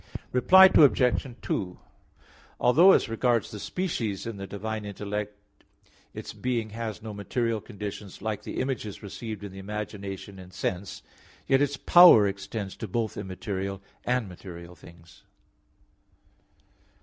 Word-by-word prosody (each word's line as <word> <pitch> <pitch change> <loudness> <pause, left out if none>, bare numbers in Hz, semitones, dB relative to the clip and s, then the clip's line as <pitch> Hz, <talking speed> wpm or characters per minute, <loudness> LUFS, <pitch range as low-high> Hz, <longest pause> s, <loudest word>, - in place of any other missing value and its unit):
Reply 190 +9 +7
Obj. 140 -8 +4 0.2
2: 90 -2 -3 0.8
Although 165 +10 +6
as - - +3
regards 115 +1 0
the 105 - -7
species 115 - -3
in 115 -3 -5
the 100 0 -6
divine 110 +2 -5
intellect 105 +1 -5 0.8
its - - -8
being 120 -4 -2
has 110 -1 -5
no 110 -1 -6
material 110 +2 -2
conditions 105 -3 -8
like 105 0 -3
the - - -6
images 125 -7 -4
received 105 +1 -7
in 100 - -7
the 95 - -10
imagination 100 -1 -6
and 90 -1 -12
sense, 95 +1 -4 0.4
yet 135 +1 +3
its 145 0 0
power 175 - +8
extends 100 0 -5
to 110 - -5
both 110 +2 -2
immaterial 95 0 -4 0.2
and 125 -3 0
material 90 -1 -10
things. 85 0 -17
105 Hz, 130 wpm, -27 LUFS, 100-120 Hz, 0.8 s, power